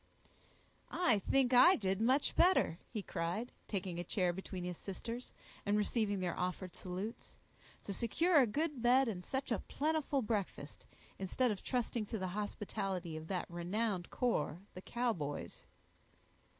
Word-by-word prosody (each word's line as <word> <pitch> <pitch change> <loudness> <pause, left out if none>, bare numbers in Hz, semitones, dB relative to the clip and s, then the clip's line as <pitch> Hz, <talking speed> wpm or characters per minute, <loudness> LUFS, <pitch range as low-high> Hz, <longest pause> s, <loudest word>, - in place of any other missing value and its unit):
"I 245 - +3
think 260 +5 +2
I 345 +10 +9
did 190 0 0
much 260 +5 +3
better," 345 - +4
he 215 -4 -4
cried, 185 +8 -2 0.2
taking 185 -4 -3
a - - -1
chair 180 0 +1
between 185 0 -5
his 180 0 -3
sisters, 230 +5 -6 0.3
and 205 +1 +2
receiving 210 -1 +1
their 175 -2 -1
offered 180 0 -2
salutes, 190 +5 -6 0.5
"to 200 - -4
secure 310 - +3
a 255 - +5
good 295 +3 -1
bed 250 +2 +5
and 185 -5 -3
such 265 +3 -3
a 230 - +2
plentiful 300 -3 0
breakfast, 200 -9 -3 0.3
instead 225 +6 +1
of 200 - -4
trusting 240 -3 -1
to 225 - -3
the 185 -2 -2
hospitality 190 -3 -3
of 155 0 -6
that 180 -1 -1
renowned 180 +2 -2
corps, 200 - 0 0.2
the 185 - -8
Cowboys." 190 -12 -3
210 Hz, 150 wpm, -36 LUFS, 180-245 Hz, 0.5 s, I